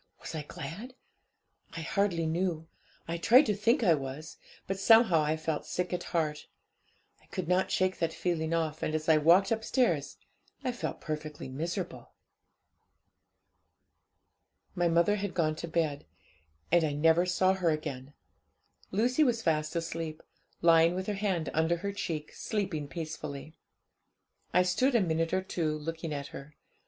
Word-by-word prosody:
Was - - -8
I 155 - -3
glad? 175 - -8 0.8
I - - -3
hardly 170 -1 0
knew 165 -1 -1 0.4
I 170 +1 -2
tried 250 - +6
to 210 - +1
think 230 +6 +2
I 175 -6 +6
was; 140 +1 -5 0.3
but 195 0 -3
somehow 225 -6 +6
I 155 +1 0
felt 155 -1 -3
sick 180 0 -2
at 175 - -3
heart; 155 -3 -2 0.7
I - - -26
could 185 -4 -4
not 180 +1 +2
shake 185 0 0
that 165 -1 0
feeling 160 -2 -2
off, 160 -2 -1
and 155 - -1
as 155 0 -3
I 160 -1 +5
walked 175 +7 +5
upstairs, 220 - 0 0.5
I 255 - 0
felt 245 - -5
perfectly 155 -3 -5
miserable. 170 +7 -5 2.6
'My 175 -2 +1
mother 170 +5 +3
had 200 -2 -4
gone 155 -3 +1
to 170 - -5
bed; 160 -3 -1 0.6
and 170 0 +5
I 150 -2 0
never 165 +4 +3
saw 185 +1 +3
her 185 -3 +1
again! 145 -3 -4 0.7
Lucy 245 +9 +2
was 235 -5 +1
fast 155 -1 0
asleep, 165 -1 -4 0.4
lying 165 +1 +5
with 185 0 -3
her 210 - -2
hand 195 -5 -1
under 160 +2 +2
her 200 +3 -4
cheek, 155 -6 -4
sleeping 190 -9 -3
peacefully. 155 -2 -6 1.0
I 180 - +4
stood 250 +9 +2
a - - +6
minute 165 -2 0
or 185 0 0
two 160 -5 -2
looking 165 +1 -5
at 140 -1 -4
her. 140 +2 -10
165 Hz, 155 wpm, -30 LUFS, 155-190 Hz, 2.6 s, tried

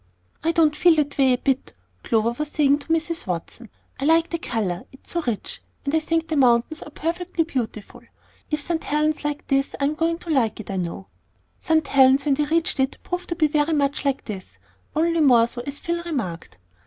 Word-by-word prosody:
"I 330 - +2
don't 315 -3 +3
feel 340 +2 +5
that 290 -2 -1
way 265 -2 +5
a - - +1
bit," 270 +1 -1 0.3
Clover 225 +1 +1
was 300 +6 -3
saying 290 -1 +3
to 285 - -12
Mrs. 330 -3 0
Watson. 180 +6 -5 0.3
"I 270 - -2
like 325 +2 +3
the 335 - -2
color, 195 - -2
it's 265 - -12
so 340 - 0
rich; 225 -4 -3 0.2
and 280 - -1
I 320 - +4
think 325 +1 -1
the 315 - -2
mountains 250 +2 +3
are - - -8
perfectly 335 +3 -2
beautiful. 245 -9 -5 0.5
If 300 -1 0
St. 330 +2 -1
Helen's 305 +1 +1
is - - -9
like 295 0 -3
this 275 -1 0
I - - -1
am 285 +2 +2
going 330 +1 0
to 340 -1 -6
like 235 -8 +1
it, 210 - -7
I 195 - -2
know." 180 +1 -4 0.5
St. 315 -2 +1
Helen's, 270 0 +5
when 290 - +3
they 295 +2 +1
reached 325 0 0
it, 265 0 +1
proved 360 0 -4
to 340 - -1
be 320 -2 +3
very 300 +1 +1
much 285 -2 0
"like 275 -2 -1
this," 190 - -8 0.4
only 335 +1 +2
more 245 -6 +6
so, 240 +1 -6
as 280 0 -2
Phil 340 +2 -2
remarked. 185 - -4
290 Hz, 215 wpm, -23 LUFS, 250-325 Hz, 0.5 s, more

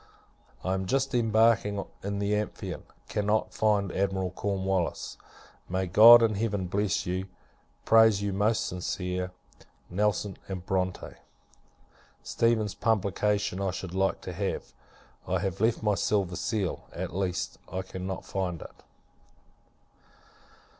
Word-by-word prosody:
I 95 - 0
am 95 0 -2
just 135 +4 0
embarking 110 -3 +3 0.2
in 100 +1 -3
the 100 +1 0
Amphion; 105 0 -4 0.2
cannot 105 +1 0
find 105 -3 +1
Admiral 95 -1 -1
Cornwallis. 95 -2 -2 0.5
May 95 +1 0
God 115 +6 +9
in 110 -1 +3
Heaven 100 -2 -1
bless 100 0 0
you! 95 +2 -2 0.6
prays 110 -2 +6
your 100 -1 -1
most 105 +3 +1
sincere 90 0 -3 0.6
NELSON 100 0 0 0.2
& 90 -1 -6
BRONTE. 95 -1 -2 1.1
Stephens's 110 -4 +1
publication 105 -1 0
I 100 - 0
should 90 -1 -5
like 95 0 0
to - - -6
have. - - -3 0.5
I 95 - +1
have 95 +1 -3
left 110 0 +2
my 105 -1 +3
silver 95 -3 0
seal; 100 0 -2
at - - -5
least, 95 -2 -2
I 95 0 -3
cannot 95 0 -6
find 90 -4 -3
it. - - -15
100 Hz, 125 wpm, -28 LUFS, 95-105 Hz, 1.1 s, God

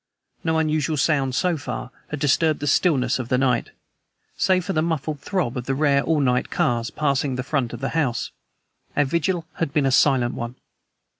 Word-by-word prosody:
No 160 -1 +1
unusual 155 0 0
sound, 135 -3 +1
so 170 +5 +1
far, 125 -3 -6 0.2
had 145 - -5
disturbed 150 +2 +2
the 145 - -3
stillness 135 -5 +2
of 120 -2 -5
the 125 - +2
night. 125 -2 +1 0.7
Save 185 -2 +2
for 195 - -2
the 155 - +2
muffled 155 -2 -2
throb 165 -8 -2
of 125 - -5
the 135 - 0
rare 140 -1 +3
all 160 0 +1
night 125 -3 +1
cars 120 -1 0
passing 140 -2 0
the 125 - -3
front 130 -3 -1
of 120 - -7
the 135 - -1
house, 135 -8 -1 0.7
our 145 - +4
vigil 170 +4 0
had 165 -4 -1
been 145 -1 +1
a 135 - +2
silent 130 -2 +3
one. 120 +1 -5
140 Hz, 195 wpm, -23 LUFS, 130-160 Hz, 0.7 s, our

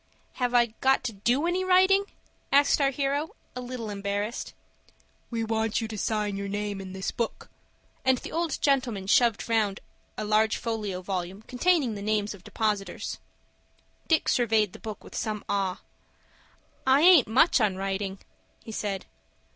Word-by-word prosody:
"Have 245 0 +1
I 235 -2 +4
got 265 0 +3
to 240 -2 -3
do 240 +9 +1
any 360 +2 0
writing?" 375 +2 +5 0.5
asked 285 +1 +4
our 275 - +4
hero, 280 +3 -2 0.2
a 250 - -4
little 245 -3 -5
embarrassed. 200 +3 -3 0.8
"We 230 -1 -2
want 220 -1 0
you 225 - -3
to 220 - -7
sign 210 -1 -1
your 200 0 -4
name 205 0 -3
in 190 -1 -8
this 190 0 -3
book," 235 - -4 0.5
and 260 0 +4
the - - -8
old 335 0 -1
gentleman 250 -8 +1
shoved 230 +2 +3
round 215 -4 +1 0.4
a - - -3
large 215 +1 +2
folio 210 -5 -3
volume 185 +2 -4
containing 275 -1 +1
the 205 - -6
names 210 0 0
of 195 -3 -14
depositors. 210 -1 -2 0.9
Dick 320 -2 +2
surveyed 220 -5 +2
the - - -11
book 215 -2 -7
with - - -13
some 215 -2 -3
awe. 195 -2 -1 1.1
"I 265 +2 +5
aint 340 -7 +7
much 255 +5 +4
on 205 -3 +2
writin'," 195 0 -3 0.5
he 225 - -8
said. 200 -3 -3
220 Hz, 160 wpm, -27 LUFS, 200-260 Hz, 1.1 s, aint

